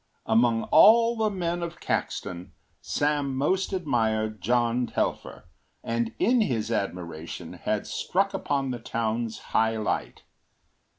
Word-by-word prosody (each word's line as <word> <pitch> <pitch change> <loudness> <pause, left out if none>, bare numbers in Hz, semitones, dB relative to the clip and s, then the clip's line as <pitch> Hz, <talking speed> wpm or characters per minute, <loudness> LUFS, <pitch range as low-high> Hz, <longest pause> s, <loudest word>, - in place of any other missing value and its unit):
Among 115 0 +3
all 230 +1 +7
the 220 -1 +1
men 175 -3 -2
of 170 0 -5
Caxton, 90 -2 -3 0.3
Sam 145 -2 0
most 185 +9 0
admired 110 - 0
John 120 +1 +1
Telfer - - -3 0.4
and 115 -1 -1
in 240 +2 +3
his 115 - -1
admiration 85 -6 -4
had - - -2
struck - - -1
upon 135 -2 -1
the 120 - -4
town’s 115 -1 -2 0.2
high 110 0 +2
light. 110 - -3
120 Hz, 120 wpm, -26 LUFS, 110-165 Hz, 0.4 s, all